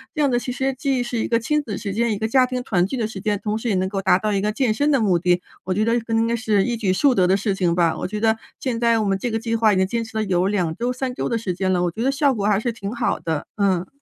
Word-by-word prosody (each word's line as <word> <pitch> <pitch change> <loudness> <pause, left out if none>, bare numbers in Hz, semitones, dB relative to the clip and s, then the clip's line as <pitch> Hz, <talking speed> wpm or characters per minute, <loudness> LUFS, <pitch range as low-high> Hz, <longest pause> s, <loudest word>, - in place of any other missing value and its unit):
这 305 - 0
样 280 - +2
的 240 - +2
其 245 +1 -5
实 265 +2 -1
既 260 -1 -1
是 240 -1 -3
一 - - -1
个 230 - +2
亲 300 +6 0
子 215 -8 -5
时 200 -3 -4
间， 235 +2 +1
一 - - -3
个 220 +2 -1
家 255 +2 +3
庭 250 0 -3
团 185 -8 +1
聚 260 - -4
的 230 - 0
时 215 -2 -6
间， 205 -1 -1
同 210 0 -1
时 235 - -3
也 205 - +1
能 185 0 0
够 195 0 -3
达 185 - +4
到 215 +2 -1
一 195 - +1
个 210 +1 0
健 235 0 +1
身 285 +6 0
的 275 - +3
目 190 -5 +2
的， 180 0 +2 0.2
我 185 - -1
觉 210 +3 +1
得 230 - +1
这 230 - -12
个 230 - -3
应 225 0 +3
该 230 - 0
是 215 -4 +1
一 240 +1 -1
举 200 -5 +1
数 275 +7 +3
得 185 -6 +3
的 190 - +4
事 200 +1 0
情 180 -3 0
吧。 170 -2 +2
我 - - -3
觉 210 +2 -5
得 220 0 +3 0.2
现 245 -4 -2
在 230 -1 +3
我 215 - 0
们 195 -1 +1
这 245 - -2
个 225 - -1
计 230 0 -3
划 220 -2 +3
已 - - +1
经 190 - +3
坚 230 +4 -2
持 225 -1 -7
了 220 - +1
有 185 -2 +1
2 185 -5 0
周、 240 +1 -1
3 255 0 -3
周 - - -3
的 235 - 0
时 210 -5 -3
间 185 +1 -1
了， 180 -1 +1
我 175 - 0
觉 220 - -6
得 265 - +2
效 275 0 +2
果 205 -4 -2
还 210 -2 +3
是 240 +2 -1
挺 205 -3 -6
好 240 - -1
的， 160 -3 -3
嗯。 190 -3 +1
220 Hz, 370 characters per minute, -22 LUFS, 195-240 Hz, 0.2 s, 达